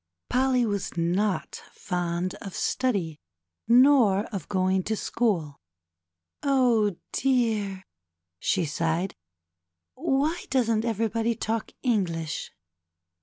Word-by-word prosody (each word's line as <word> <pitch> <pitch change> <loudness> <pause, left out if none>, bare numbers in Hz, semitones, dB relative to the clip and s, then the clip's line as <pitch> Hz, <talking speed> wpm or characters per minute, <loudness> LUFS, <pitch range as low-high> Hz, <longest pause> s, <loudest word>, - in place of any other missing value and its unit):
Polly 255 -1 +3
was 200 -4 -3
not 185 +4 0
fond 175 -1 -2
of 195 - -7
study 195 - -1 0.5
nor 240 -5 +5
of 190 -6 -5
going 190 -1 +2
to 220 - 0
school. 180 -11 -1 0.8
Oh, 245 -8 +3 0.2
dear," 220 -7 0 0.6
she 185 -4 +1
sighed, 165 +4 -1 0.8
^^why 300 +3 0
doesn't 230 -4 +1
everybody 225 +1 0
talk 220 +1 -2
English 175 - -1
210 Hz, 90 wpm, -26 LUFS, 185-245 Hz, 0.8 s, nor